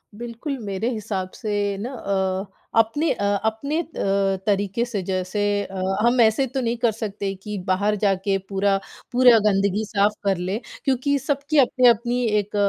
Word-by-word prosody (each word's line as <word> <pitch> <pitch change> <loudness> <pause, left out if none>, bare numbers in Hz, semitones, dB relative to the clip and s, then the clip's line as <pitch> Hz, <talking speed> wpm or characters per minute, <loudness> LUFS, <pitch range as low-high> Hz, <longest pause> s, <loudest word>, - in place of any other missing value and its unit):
बिल्कुल, 240 +5 -5
मेरे 200 +4 -2
हिसाब 205 -5 -3
से 205 -3 -2
ना 250 +4 -5
अ 190 -3 -1 0.3
अपने 230 +9 +3
अ, 205 - -5 0.2
अपने 280 +8 -1
अ, - - -8 0.6
तरीक़े 205 +2 +1
से 215 -5 -3
जैसे 185 +2 -2 0.2
अ, 190 -1 -6 0.2
हम 245 +1 +3
ऐसे 225 +4 +4
तो 265 +2 -3
नहीं 235 -1 -1
कर 230 -1 +2
सकते 205 -2 -4
कि 210 -1 -4
बाहर 200 +3 +2
जाके 195 -1 +1
पूरा 195 0 +2 0.3
पूरा 245 -2 +6
गंदगी 200 +1 +2
साफ 205 0 +2
कर 195 -2 +1
लें 185 +5 -2 0.3
क्योंकि 275 +2 +1
सबकी 285 +3 -1
अपनी-अपनी 245 -1 +3 0.2
एक 205 0 -5
210 Hz, 155 wpm, -23 LUFS, 195-245 Hz, 0.6 s, पूरा